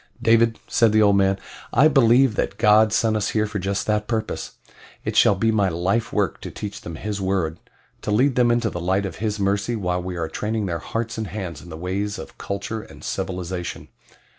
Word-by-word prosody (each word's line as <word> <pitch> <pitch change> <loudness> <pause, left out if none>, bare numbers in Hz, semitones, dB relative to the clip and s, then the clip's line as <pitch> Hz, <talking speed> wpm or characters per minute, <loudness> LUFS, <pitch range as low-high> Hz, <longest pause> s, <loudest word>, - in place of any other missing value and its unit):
"David," 115 0 +3
said 115 -3 +3
the 110 - +5
old 100 -1 +5
man, 95 0 +3 0.3
"I 150 - +6
believe 130 -3 +5
that 100 -1 -2
God 105 +1 +5
sent 110 +1 +2
us 105 - 0
here 110 -1 +1
for 105 -1 -4
just 100 +1 -2
that 105 -1 0
purpose 110 -2 -3 0.5
it - - -2
shall 100 - +6
be 110 +4 +2
my 100 -3 +2
life 95 +7 0
work 100 -4 -1
to - - -6
teach 105 -1 -7
them 85 - -7
His 100 +3 -4
word 95 -4 -1 0.4
to - - -5
lead 130 +7 +3
them 120 -1 +3
into 120 -2 +1
the 85 - -5
light 95 +3 +1
of 95 - -6
His 105 -1 -2
mercy 100 +4 0
while 90 -4 -1
we 90 0 -5
are 80 -1 -2
training 105 +4 -2
their 85 -3 -2
hearts 115 +5 -4
and 110 - -3
hands 90 -4 -6
in 90 - -12
the 80 - -7
ways 100 +4 -2
of - - -10
culture 100 +3 -4
and - - -14
civilization." 90 -1 -4
105 Hz, 215 wpm, -23 LUFS, 95-110 Hz, 0.5 s, I